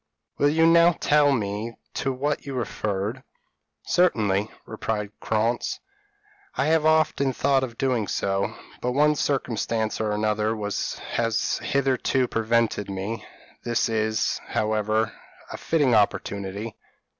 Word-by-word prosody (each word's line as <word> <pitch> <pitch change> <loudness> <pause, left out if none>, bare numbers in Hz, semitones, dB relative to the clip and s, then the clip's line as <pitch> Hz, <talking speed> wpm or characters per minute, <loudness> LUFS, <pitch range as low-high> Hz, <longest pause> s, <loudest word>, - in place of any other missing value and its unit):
Will 145 - +4
you 160 +2 +3
now 170 +1 +6
tell 145 -1 +3
me 110 -1 -2 0.2
to 135 - -1
what 140 +3 -2
you 135 - -4
referred?" 110 -1 -2 0.6
"Certainly," 110 - +2 0.2
replied 110 -2 -3
Krantz; 115 +2 0 0.8
"I've 155 +1 +2
often 155 -4 +2
thought 135 +1 +2
of 120 -3 -5
doing 125 -6 0
so, 95 0 -1 0.3
but 125 0 -1
one 150 +3 +4
circumstance 115 -6 -1
or 110 -1 0
another 105 +1 0
has 110 +2 -2
hitherto 135 -2 +1
prevented 115 -2 0
me; 100 +3 -4 0.4
this 120 -1 0
is, 110 0 0
however, 110 0 0 0.4
a - - -5
fitting 145 -6 +2
opportunity. 100 0 0
115 Hz, 115 wpm, -25 LUFS, 105-135 Hz, 0.8 s, now